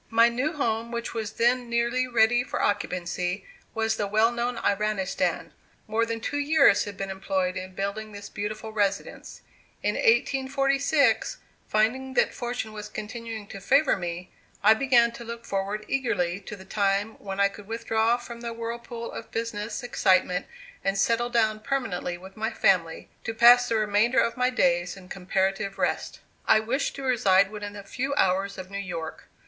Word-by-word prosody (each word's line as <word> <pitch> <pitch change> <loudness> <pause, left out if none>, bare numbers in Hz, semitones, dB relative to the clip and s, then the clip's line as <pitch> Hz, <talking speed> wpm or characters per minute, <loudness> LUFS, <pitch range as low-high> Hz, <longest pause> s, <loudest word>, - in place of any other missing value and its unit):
My 230 +1 +5
new 255 +7 -1
home, 230 -5 -1
which 235 0 -4
was 220 -2 -4
then 240 +1 +1
nearly 235 +2 +1
ready 240 0 +3
for - - -4
occupancy, 180 -1 -1 0.3
was 225 0 0
the 205 - -1
well 215 +3 +3
known 240 0 -2
Iranistan. 205 -3 0 0.3
More 225 +2 0
than 230 0 -3
two 290 +6 -2
years 285 -7 +4
had 205 -2 -8
been 195 0 -4
employed 190 -1 -1
in 185 0 -6
building 205 +3 -3
this 205 0 -8
beautiful 215 +2 -5
residence. 200 -2 -2 0.4
In - - +1
1846, 275 - +2 0.3
finding 260 +5 0
that - - +3
fortune 240 -3 -4
was 210 -1 -7
continuing 220 0 -6
to 195 - -8
favor 275 +9 +4
me, 175 -1 -5 0.3
I 215 +2 +8
began 240 -1 +4
to 235 0 -9
look 235 0 -7
forward 200 +2 -2
eagerly 195 -10 0
to 210 - -5
the 190 -1 -13
time 200 +1 0
when 195 -1 -6
I 200 - +5
could 200 0 -11
withdraw 225 +1 +1
from 235 -1 -9
the 235 -1 -4
whirlpool 235 0 -6
of 230 - -8
business 225 +1 -4
excitement 185 -6 +2 0.4
and 195 0 0
settle 235 +4 +2
down 220 -3 +2
permanently 215 -9 -2
with 190 +2 -13
my 220 +1 -1
family, 180 -7 +1
to 225 - -4
pass 245 +1 +7
the 230 - +1
remainder 215 +4 +3
of 230 - +1
my 250 0 +2
days 175 -6 +1
in 185 -1 -13
comparative 195 +1 -1
rest. - - -2 0.3
I 220 - +6
wished 245 +6 -1
to 275 - -7
reside 200 -6 +3
within 205 -1 -6
a 200 - -8
few 270 +7 -3
hours 195 -2 +1
of 185 0 -8
New 200 - -4
York. 170 -5 -6
220 Hz, 170 wpm, -26 LUFS, 195-240 Hz, 0.4 s, I